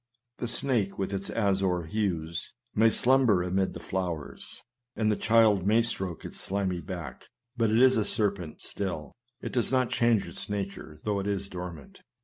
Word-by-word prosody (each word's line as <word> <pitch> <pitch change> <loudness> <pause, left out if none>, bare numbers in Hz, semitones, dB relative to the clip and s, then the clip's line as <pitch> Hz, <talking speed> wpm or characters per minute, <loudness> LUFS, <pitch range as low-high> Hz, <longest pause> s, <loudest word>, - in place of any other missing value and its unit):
The 120 - -2
snake 115 -5 +1
with 95 0 -2
its 100 0 -3
azure 95 -4 +1
hues, 85 -3 -3 0.2
may 115 +1 +5
slumber 120 -6 +4
amid 95 +1 -1
the - - -6
flowers, 90 -5 -5 0.3
and 110 -1 +1
the - - +2
child 110 -4 +3
may 110 +3 +4
stroke 95 -7 -2
its - - -5
slimy 95 -2 -1
back, 85 -9 -8 0.3
but 115 -3 +1
it 110 +2 +3
is 130 -1 +6
a 110 - +2
ser 105 -1 +5
pent 90 -6 -9
still; 90 -7 -4 0.3
it - - -6
does 120 -1 0
not 130 -2 +1
change 115 -3 +2
its - - -7
nature, 100 -6 -5
though 105 -2 0
it 100 - -3
is 100 -1 -2
dormant. 90 -5 -8
100 Hz, 175 wpm, -28 LUFS, 90-110 Hz, 0.3 s, is